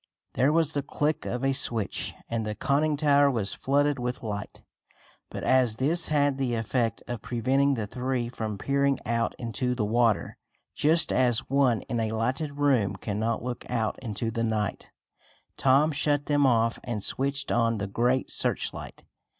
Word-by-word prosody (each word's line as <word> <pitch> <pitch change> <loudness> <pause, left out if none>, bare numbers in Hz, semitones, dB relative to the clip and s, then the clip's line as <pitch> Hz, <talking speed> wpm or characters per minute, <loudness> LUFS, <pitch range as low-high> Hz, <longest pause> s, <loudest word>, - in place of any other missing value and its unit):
There 135 +4 +3
was 160 -1 +1
the 145 - 0
click 150 +2 -2
of 125 +2 -2
a 135 - +2
switch, 115 -6 -1
and 115 -1 -2
the 105 0 -3
conning 145 +6 +1
tower 145 -1 +4
was 110 -7 -1
flooded 145 0 +1
with 125 0 -4
light. 105 -2 -6 0.7
But - - -6
as 125 -4 +3
this 155 +8 +1
had 145 -2 +1
the 125 -3 0
effect 115 +1 -1
of 120 -3 -5
preventing 130 +3 +1
the 110 -3 -3
three 125 +2 -2
from 110 -4 -4
peering 140 +4 +1
out 115 -1 0
into 125 +2 -2
the 110 -4 -1
water, 110 -4 +1 0.4
just 160 +3 +3
as 125 -2 +2
one 135 -4 +2
in 120 - -3
a 110 -1 -1
lighted 135 +6 -2
room 125 -9 +2
cannot 110 +3 -2
look 125 -1 -4
out 115 -3 -1
into 115 -1 -3
the 115 0 -2
night, 110 -3 -2 0.7
Tom 140 +4 +3
shut 145 0 0
them 145 -2 +3
off 115 -2 +2
and 110 -4 -4
switched 140 +1 -1
on 115 -1 +2
the 100 - -2
great 120 +6 0
searchlight. - - -2
125 Hz, 165 wpm, -27 LUFS, 115-140 Hz, 0.7 s, tower